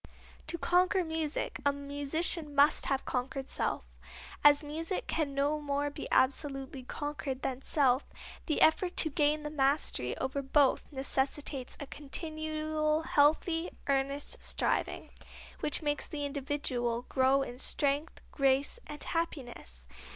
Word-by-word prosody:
To 335 +2 +1
conquer 365 +2 +3
music 320 -2 -2
a 285 - +4
musician 285 +2 +1
must 285 +2 +5
have 270 -1 0
conquered 265 +1 -3
self. - - -1 0.6
As 290 +1 +7
music 325 +5 -3
can 295 -4 -1
no 290 +2 +1
more 285 0 -1
be - - -6
absolutely 270 0 0
conquered 275 0 -5
than 260 0 -2
self, 270 -2 +2 0.4
the 310 - 0
effort 355 +3 +3
to 315 - +1
gain 300 +1 +2
the 300 - -4
mastery 270 - 0
over 275 +2 -2
both 275 +1 +2
necessitates 270 -1 -2
a 285 - -5
continual 310 +1 -2
healthy, 320 +3 +2 0.2
earnest 275 +1 -1
striving, - - -1 0.5
which 300 - +1
makes 295 -1 -1
the 290 -2 -4
individual 270 -4 -2
grow 265 +1 +3
in 245 -1 -7
strength, 285 +3 0
grace 275 - +2
and 295 - -6
happiness. 245 - -4
290 Hz, 130 wpm, -31 LUFS, 270-310 Hz, 0.6 s, As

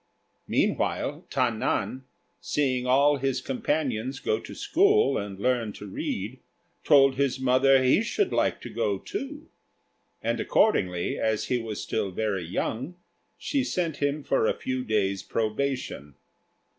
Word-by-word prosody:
Meanwhile, - - 0
Ta - - +1
nan, 130 0 -2 0.3
seeing 130 -4 0
all 140 +3 +4
his 135 -1 -1
companions 135 -2 -2
go 440 - 0
to - - -10
school 405 +5 +3
and 100 -1 -6
learn 115 -1 0
to - - -9
read, 100 +4 -4 0.4
told 135 -3 +5
his 135 -2 +1
mother 130 +1 +4
he 130 +10 +4
should 380 - 0
like - - +1
to - - -7
go - - 0
too; 300 -6 -6 0.8
and - - 0
accordingly, 90 - +1
as 110 -1 0
he 125 - +1
was 110 -3 -5
still 100 - -1
very 100 -1 -2
young, 120 - -3 0.4
she 275 -2 -1
sent 175 - -2
him 145 +1 -1
for 135 -5 +2
a - - +1
few 130 0 -3
days' 100 -4 0
probation. 110 - -3
130 Hz, 140 wpm, -27 LUFS, 110-145 Hz, 0.8 s, told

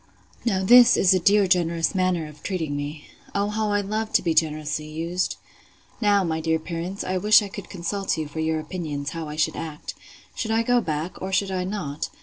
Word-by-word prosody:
Now 195 -5 0
this 245 +4 +7
is 190 - +5
a 185 - +3
dear 200 +3 +4
generous 170 -2 +1
manner 185 -3 +1
of 150 0 -14
treating 160 -7 -3
me. 145 +1 -5 0.3
O 200 +1 +1
how 215 0 -1
I 205 0 +2
love 215 +2 -3
to - - +3
be 165 -2 +1
generously 155 -1 0
used!—Now, 180 +5 -2
my 160 -2 -1
dear 160 0 +1
parents, 170 +4 -5
I 185 0 -1
wish 210 +2 +6
I - - -4
could 200 0 -9
consult 190 +1 -2
you 155 -1 -3
for 150 +2 -7
your 160 0 0
opinions, 155 -4 -4
how 165 -2 -5
I 150 - -6
should 155 - 0
act. 155 -2 -6 0.4
Should 220 - -4
I 225 +1 +2
go 245 +1 +3
back, 155 -1 -4
or 190 - -4
should 195 0 +1
I 185 -1 -1
not? 170 -7 -4
180 Hz, 205 wpm, -24 LUFS, 160-200 Hz, 0.4 s, this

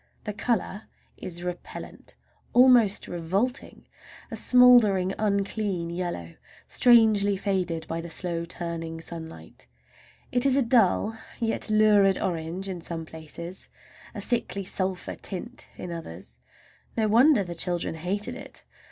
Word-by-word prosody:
The 210 - -4
color 215 -1 -2 0.3
is 175 -1 -7
repellant, 180 0 -8 0.4
almost 245 -5 +5
revolting; 190 +9 -3 0.5
a - - -4
smouldering, 230 -7 +5
unclean 200 -4 -1
yellow, 170 - -5 0.3
strangely 220 -5 +4
faded 185 -5 -2
by 165 0 -3
the 170 - -8
slow 170 0 -2
turning 165 -1 -5
sunlight. 160 - -9 0.6
It 245 0 +5
is 270 -1 +4
a 275 - +3
dull 225 -2 +2 0.2
yet 225 -1 +1
lurid 210 -2 +4
orange 175 +2 -3
in 180 -3 -5
some 165 -1 -6
places, 160 +3 -9 0.5
a - - -5
sickly 230 -4 -1
sulphur 185 0 -2
tint 235 +6 -6
in 180 - -7
others. 95 - -9 0.6
No 220 -1 +2
wonder 235 +2 +5
the 175 -2 -6
children 175 0 0
hated 180 +6 -2
it! - - -6
190 Hz, 125 wpm, -26 LUFS, 170-215 Hz, 0.6 s, almost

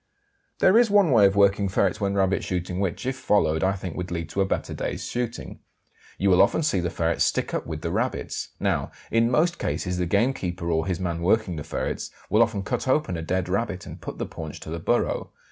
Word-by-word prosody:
There 200 +5 +5
is 240 -2 +4
one 200 -6 +4
way 105 -5 +7
of 95 - -1
working 100 0 +3
ferrets 95 +1 +1
when 100 0 0
rabbit 95 0 +1
shooting 90 0 -3
which, 100 +3 -2
if 130 0 -1
followed, 100 -11 +1
I 95 +1 +3
think 90 -3 -6
would 90 0 -4
lead 85 -2 -4
to 100 +4 -1
a - - +3
better - - -2
day's - - -4
shooting. 120 -1 -4 0.6
You 100 0 +2
will 90 - +6
often 100 +10 +3
see 100 -11 +1
the 90 0 -1
ferrets 85 0 0
stick - - 0
up - - -2
with 80 -1 -5
the 85 - -2
rabbits. 115 +7 -2
Now, - - 0 0.2
in 115 +1 +3
most 170 +7 +2
cases 90 -1 -2
the 90 - 0
gamekeeper 90 -5 0
or 80 0 0
his 90 -2 -1
man 85 -2 -2
working 95 0 +2
the 75 - -5
ferrets - - -3 0.2
will 110 - +5
often 110 -4 +1
cut 105 - -2
open 130 -8 +1
a 80 - -4
dead 90 +2 -1
rabbit 100 0 -2
and - - -10
put - - -7
the - - -2
paunch 80 -2 -8
to 80 - -8
the 85 - -3
burrow. - - 0
95 Hz, 230 wpm, -25 LUFS, 85-115 Hz, 0.6 s, way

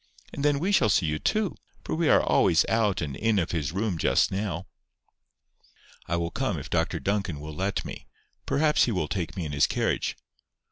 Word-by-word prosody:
And 140 - -4
then 145 -1 +3
we 180 +8 0
shall 125 - +4
see 95 - +3
you 75 0 -1
too. 215 - 0 0.3
For - - -4
we 160 -1 +1
are - - +5
always - - +3
out 105 -5 +1
and 75 -4 -3
in 110 -1 +1
of 85 -3 0
his 75 -4 -2
room 95 -2 -2
just - - +3
now." 95 -3 -3 1.4
"I 85 - 0
will 85 0 -2
come 115 -7 -1
if 70 - -8
Dr - - 0
Duncan 100 -6 -1
will 75 +1 -7
let 95 +6 -2
me. - - -8 0.4
Perhaps 150 +1 +3
he 120 - -1
will 90 -7 -1
take 90 0 -4
me 90 - -2
in 75 - -4
his 70 -1 +3
carriage." - - -1
95 Hz, 200 wpm, -27 LUFS, 80-115 Hz, 1.4 s, are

